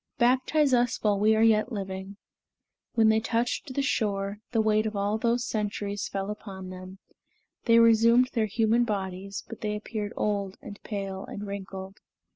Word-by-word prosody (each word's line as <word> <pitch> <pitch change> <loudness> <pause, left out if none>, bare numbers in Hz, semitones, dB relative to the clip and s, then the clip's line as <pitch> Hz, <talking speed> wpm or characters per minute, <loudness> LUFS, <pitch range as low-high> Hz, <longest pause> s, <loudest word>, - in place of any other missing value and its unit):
Baptize 260 +3 +3
us 245 -1 +2
while 205 -2 +2
we 215 +1 +4
are 220 - +3
yet 225 +2 +3
living." 195 -1 -5 0.8
When 220 -1 +5
they 220 0 +4
touched 235 +5 -1
the 275 +2 -1
shore, 200 -5 -1
the 230 - +1
weight 215 0 +2
of 215 - -5
all 205 +2 0
those 240 +1 +1
centuries 205 -2 -2
fell 195 +1 -3
upon 190 -3 -8
them; 185 +1 -9 0.7
they 230 0 +5
resumed 230 +2 +5
their 225 -3 +1
human 225 +3 +2
bodies, 195 -2 -4
but 225 - -9
they 210 -1 -1
appeared 210 0 -5
old 200 -2 -1
and 205 -1 -10
pale 195 -2 -5
and 205 - -7
wrinkled. 195 -1 -7
210 Hz, 165 wpm, -27 LUFS, 200-230 Hz, 0.8 s, When